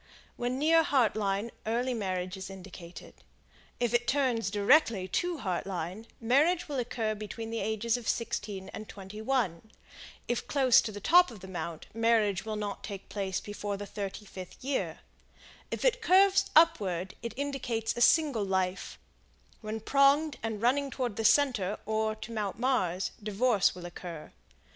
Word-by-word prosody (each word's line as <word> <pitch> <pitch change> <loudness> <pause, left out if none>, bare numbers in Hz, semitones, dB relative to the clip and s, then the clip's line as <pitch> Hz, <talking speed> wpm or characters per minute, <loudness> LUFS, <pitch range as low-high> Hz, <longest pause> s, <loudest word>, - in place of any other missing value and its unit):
When 245 +1 -2
near 325 +3 +5
Heart 265 -7 +2
Line 205 +1 -1 0.2
early 245 +3 0
marriage 185 -4 -2
is 190 0 -7
indicated; 185 -2 -10 0.7
if 240 -2 0
it 240 0 +2
turns 250 -6 +1
directly 205 -1 +3
to 350 - -1
Heart 185 -8 -3
Line, 185 +4 -5
marriage 295 +10 +2
will 285 -3 -2
occur 230 -2 -1
between 215 +2 -6
the 230 - -2
ages 220 +3 0
of 240 - -8
16 205 -4 -3
and 215 0 -8
21; 210 -1 -3 0.6
if 240 - -2
close 265 -4 +5
to 220 - -4
the 205 - -7
top 355 - +6
of 220 -6 -11
the 190 - -9
mount, 170 -3 -5
marriage 220 -4 +2
will 215 -1 -3
not 205 -1 -4
take 200 -2 -7
place 195 -2 -2
before 205 -1 -5
the 205 - -6
35th 195 -2 -7
year; 270 +1 -2 0.7
if - - -3
it - - +3
curves 390 -1 +5
upward 190 - +3
it 235 -2 -5
indicates 245 -5 -2
a 240 - -3
single 275 -3 +4
life; 190 -1 -1 0.6
when 215 0 -4
pronged 275 +5 +3
and 220 -1 -4
running 275 +3 +2
toward 250 -4 -3
the 225 - -2
center 220 -7 +3
or 220 0 0
to 220 +1 -9
Mount 210 -4 -3
Mars, 205 -8 0
divorce 210 0 +2
will 180 -1 -8
occur. 170 -2 -8
220 Hz, 160 wpm, -30 LUFS, 195-255 Hz, 0.7 s, top